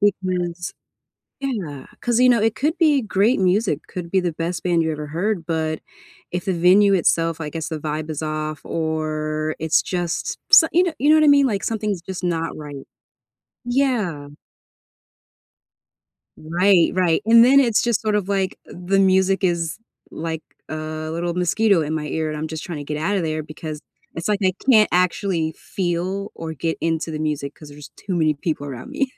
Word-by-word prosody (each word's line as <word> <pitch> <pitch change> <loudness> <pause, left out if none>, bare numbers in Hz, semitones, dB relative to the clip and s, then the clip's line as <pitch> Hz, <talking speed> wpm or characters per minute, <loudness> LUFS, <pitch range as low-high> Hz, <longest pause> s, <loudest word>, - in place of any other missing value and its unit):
Because 180 -3 -1 0.7
Yeah, 185 - -4 0.2
'cause, 240 -1 +1
you 250 0 +6
know, 235 -3 +4
it 225 0 +1
could 305 +4 0
be 300 -5 +4
great 210 +2 +2
music, 185 -4 +1
could 175 -2 -6
be 190 - +2
the 175 -2 -1
best 170 +2 -3
band 175 -2 +2
you 160 - 0
ever 150 -1 -5
heard. 175 +2 -2
But 160 -2 -2 0.5
if 180 0 -3
the 190 - 0
venue 190 +4 +5
itself, 165 -2 +1
I 150 - -4
guess, 160 0 -5
the 160 - -3
vibe 155 +1 -4
is 155 0 -4
off 155 0 -3
or 155 -1 -2
it's 160 0 +2
just 175 -2 -3
s - - +9
ya 350 - +4
know 355 -3 -1
ya 290 +3 +2
know 310 - +7
what 310 - +4
I - - +4
mean? 285 -1 +6
Like, 205 -6 -1
something's 210 -5 -2
just 185 0 -7
not 165 -2 -1
right. 145 -2 -9 0.8
Yeah. 235 - 0 2.1
Right, 175 +3 +3
right, 180 0 +2
and 230 +1 +7
then 275 +2 +6
it's 235 -5 +3
just 235 -3 +1
sort 215 -1 +1
of 200 -2 -2
like 195 -2 -1
the 180 +2 -1
music 190 0 +3
is, 170 +1 0 0.3
like, 160 0 -4 0.3
a - - -4 0.4
little 170 +1 -2
mosquito 180 +1 +2
in 155 +1 -3
my 150 -1 -3
ear, 160 +1 -2
and 155 - -4
I'm 155 +1 -4
just 160 0 -6
trying 165 -4 -5
to 145 - -6
get 150 +1 -4
out 190 +7 0
of 185 - 0
there 155 -1 -2
because 155 0 -7 0.3
it's 165 +5 -4
like 205 -1 +1
I 185 -1 +3 0.2
can't 215 -5 +6
actually 180 -2 0
feel 185 +2 -3
or 165 -1 -6
get 160 +2 -2
into 165 0 -1
the 155 - -4
music 150 -2 -2
'cause 150 - -13
there's 145 0 -12
too 190 - -5
many 155 -2 +2
people 145 -1 -3
around 130 -3 -8
me. 270 -2 -1
175 Hz, 190 wpm, -21 LUFS, 155-200 Hz, 2.1 s, s